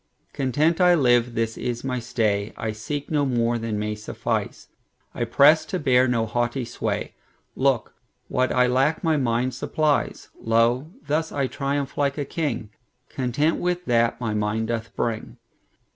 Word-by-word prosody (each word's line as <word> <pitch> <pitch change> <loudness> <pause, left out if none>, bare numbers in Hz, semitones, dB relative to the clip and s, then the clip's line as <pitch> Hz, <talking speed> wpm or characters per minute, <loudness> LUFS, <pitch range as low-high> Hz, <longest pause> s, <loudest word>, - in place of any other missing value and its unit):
Content 150 +6 +1
I 180 -1 +6
live, 120 -5 +3
this 115 0 -1
is 120 -1 -3
my 130 -1 -2
stay;I 110 -2 -1
seek 140 +9 -5
no 150 -2 +2
more 120 -3 +1
than 115 -2 -3
may 105 +1 -2
suffice;I 105 +2 -5
press 140 +7 +5
to 185 - -3
bear 130 -5 +3
no 115 -2 +1
haughty 120 +3 -1
sway; 115 - -3 0.4
Look, 130 -4 +1 0.3
what 130 0 0
I 125 0 +4
lack 135 +7 +1
my 160 -2 +2
mind 125 -1 0
supplies. 150 +4 -1
Lo, 115 +5 +2 0.2
thus 160 +2 -1
I 140 -1 0
triumph 140 +1 -3
like 140 0 +1
a 145 - -2
king, 135 -9 -3 0.4
Content 135 +5 0
with 180 0 -1
that 115 -2 +2
my 115 -3 -2
mind 105 +1 -1
doth 115 -1 -3
bring. 115 -2 -3
125 Hz, 150 wpm, -24 LUFS, 115-145 Hz, 0.4 s, I